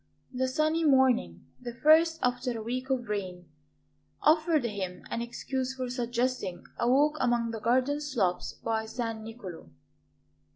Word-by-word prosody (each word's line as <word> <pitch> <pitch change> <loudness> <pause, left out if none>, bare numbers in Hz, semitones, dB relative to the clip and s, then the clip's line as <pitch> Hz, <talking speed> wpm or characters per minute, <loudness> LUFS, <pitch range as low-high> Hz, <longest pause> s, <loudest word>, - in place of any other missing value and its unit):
The 260 +1 0
sunny 310 +5 +1
morning, 260 - +3
the 240 -2 -7
first 320 +5 +5
after 245 -1 0
a 220 - -5
week 255 +3 -3
of 250 -3 -1
rain, 185 -4 -4 0.8
offered 310 -1 +4
him 195 -5 -4
an 235 - -1
excuse 260 +2 -3
for 255 -2 -4
suggesting 245 -5 -2 0.2
a 235 - +2
walk 295 +4 +3
among 240 -2 +1
the 225 - -5
garden 260 +6 +1
slopes 225 -12 -1
by 220 -1 -2
San 225 -1 -4
Niccolo. 200 - -9
245 Hz, 140 wpm, -29 LUFS, 225-265 Hz, 0.8 s, first